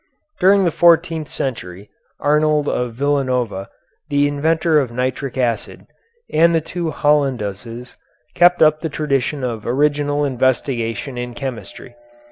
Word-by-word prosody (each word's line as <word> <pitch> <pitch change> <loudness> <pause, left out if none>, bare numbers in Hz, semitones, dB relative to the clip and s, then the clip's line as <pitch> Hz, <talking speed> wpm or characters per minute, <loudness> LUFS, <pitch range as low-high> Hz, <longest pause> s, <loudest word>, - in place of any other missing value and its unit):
During 195 +1 +5
the 170 - +2
fourteenth 165 -2 +3
century, 100 -6 -5 0.3
Arnold 150 0 +2
of 125 -2 -2
Villanova, 125 -7 -1 0.4
the 145 0 +2
inventor 160 +2 +1
of 135 -4 -1
nitric 130 +2 -3
acid, 120 -4 -2 0.5
and 165 +2 +4
the - - +3
two 170 +1 -4
Hollanduses, 125 -6 -1 0.4
kept 175 -1 +5
up 155 0 +3
the 160 - -3
tradition 140 -2 -1
of 115 -4 -4
original 145 +2 +1
investigation 130 -1 -1
in 120 -1 -6
chemistry. 120 -2 -7
140 Hz, 120 wpm, -19 LUFS, 120-155 Hz, 0.5 s, During